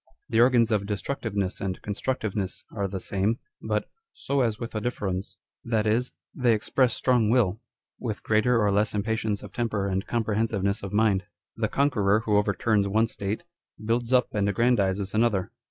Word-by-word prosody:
The 110 Hz, -, +3 dB
organs 120 Hz, -2 st, +4 dB
of 105 Hz, -2 st, +1 dB
dcslructiveness 105 Hz, -3 st, -2 dB
and 95 Hz, -1 st, -3 dB
const 105 Hz, -1 st, -5 dB
rudiveness 105 Hz, -6 st, -2 dB
are 100 Hz, -2 st, -1 dB
the 95 Hz, 0 st, -4 dB
same, 100 Hz, +4 st, 0 dB, 0.2 s
but -, -, -1 dB, 0.2 s
" 455 Hz, -, -65 dB
so 140 Hz, 0 st, +2 dB
as 115 Hz, -3 st, +1 dB
with 115 Hz, +1 st, -6 dB
a 110 Hz, -, -2 dB
difference 100 Hz, -5 st, -3 dB
" -, -, -67 dB
â€" -, -, -7 dB
that 110 Hz, -2 st, +2 dB
is, 115 Hz, +4 st, +1 dB, 0.2 s
they 125 Hz, -4 st, +3 dB
express 120 Hz, +3 st, +1 dB
strong 125 Hz, -4 st, +2 dB
will, 115 Hz, -3 st, +2 dB, 0.4 s
with 110 Hz, -4 st, -4 dB
greater 115 Hz, +2 st, +3 dB
or 105 Hz, -2 st, +3 dB
less 105 Hz, +1 st, +1 dB
impatience 110 Hz, 0 st, -1 dB
of -, -, -10 dB
temper 110 Hz, -4 st, -1 dB
and 95 Hz, 0 st, -2 dB
comprehensiveness 110 Hz, -3 st, 0 dB
of 100 Hz, -, -6 dB
mind. 105 Hz, -2 st, +2 dB, 0.3 s
The 110 Hz, -2 st, -1 dB
conqueror 110 Hz, -7 st, +2 dB
who 105 Hz, -2 st, +2 dB
over 100 Hz, 0 st, +1 dB
turns 105 Hz, -3 st, +2 dB
one 110 Hz, +3 st, +3 dB
state, 105 Hz, +3 st, -4 dB, 0.4 s
builds 115 Hz, +2 st, -1 dB
up 125 Hz, -2 st, +3 dB
and 100 Hz, -1 st, +1 dB
aggrandises 100 Hz, -3 st, +1 dB
another. 110 Hz, -3 st, +1 dB
110 Hz, 185 wpm, -26 LUFS, 100-115 Hz, 0.4 s, organs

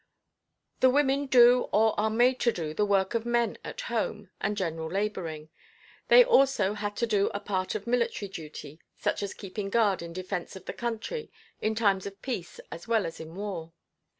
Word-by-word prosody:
The 260 Hz, -, +6 dB
women 280 Hz, +1 st, +2 dB
do 245 Hz, -1 st, +6 dB
or 220 Hz, +2 st, +4 dB
are 220 Hz, +1 st, +2 dB
made 245 Hz, +3 st, +3 dB
to 240 Hz, -, +3 dB
do 160 Hz, -6 st, -4 dB
the 210 Hz, +5 st, +1 dB
work 195 Hz, -1 st, +2 dB
of 230 Hz, -1 st, 0 dB
men 235 Hz, -1 st, 0 dB
at -, -, -6 dB
home 210 Hz, -4 st, -3 dB
and 205 Hz, 0 st, -1 dB
general 165 Hz, -4 st, -2 dB
laboring. 170 Hz, -5 st, -3 dB, 0.6 s
They -, -, +9 dB
also 275 Hz, -, +3 dB
had 205 Hz, 0 st, -4 dB
to 235 Hz, -, 0 dB
do 205 Hz, -3 st, +2 dB
a -, -, -1 dB
part 190 Hz, -2 st, -2 dB
of 205 Hz, -1 st, -4 dB
military 235 Hz, -4 st, 0 dB
duty, 155 Hz, -3 st, -9 dB, 0.2 s
such 205 Hz, 0 st, -1 dB
as 200 Hz, -1 st, -4 dB
keeping 195 Hz, 0 st, -5 dB
guard 205 Hz, -4 st, +2 dB
in 170 Hz, 0 st, -7 dB
defence 185 Hz, +1 st, -5 dB
of 190 Hz, -, -11 dB
the -, -, -5 dB
country 240 Hz, -, -4 dB, 0.3 s
in 220 Hz, 0 st, 0 dB
times 200 Hz, -4 st, +2 dB
of 200 Hz, 0 st, -10 dB
peace 210 Hz, -10 st, -5 dB
as 170 Hz, -, -8 dB
well 225 Hz, -4 st, +2 dB
as 165 Hz, -, -6 dB
in 160 Hz, +1 st, -9 dB
war. 185 Hz, -5 st, -5 dB
205 Hz, 190 wpm, -28 LUFS, 185-235 Hz, 0.6 s, They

